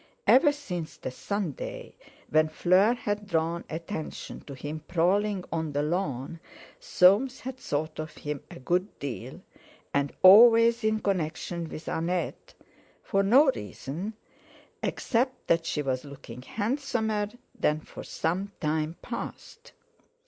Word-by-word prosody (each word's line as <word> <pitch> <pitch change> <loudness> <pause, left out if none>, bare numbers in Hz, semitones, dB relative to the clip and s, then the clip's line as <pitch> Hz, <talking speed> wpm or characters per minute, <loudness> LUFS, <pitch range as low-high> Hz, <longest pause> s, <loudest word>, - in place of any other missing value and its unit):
Ever 290 +3 +6
since 180 - -6
the - - -5
Sunday - - -4 0.4
when 155 0 +4
Fleur 185 +8 +4
had 205 -3 -3
drawn 165 -1 0
attention 160 -1 -5
to 140 - -7
him 145 +4 -5
prowling 190 +3 +1
on 160 -2 -2
the 145 +1 +1
lawn, 155 -2 -2 0.4
Soames 250 - +4
had 260 0 -6
thought 155 - -3
of 155 0 -5
him 150 -1 -4
a - - -10
good 180 +9 -1
deal, 135 -4 -6 0.5
and 140 0 +1
always 230 +4 +8
in 215 0 +1
connection 170 -2 -2
with 155 - -8
Annette, 170 +1 -2 0.5
for 195 - +1
no 265 +8 +6
reason, 165 - -6 0.7
except 255 +2 -1
that 165 0 +2
she 150 - -1
was 130 -2 -1
looking 135 -4 -10
handsomer 220 - -1 0.3
than 150 +1 +1
for - - -10
some 185 +5 -2
time 155 +1 -1
past. 235 -1 -7
180 Hz, 125 wpm, -28 LUFS, 155-220 Hz, 0.7 s, always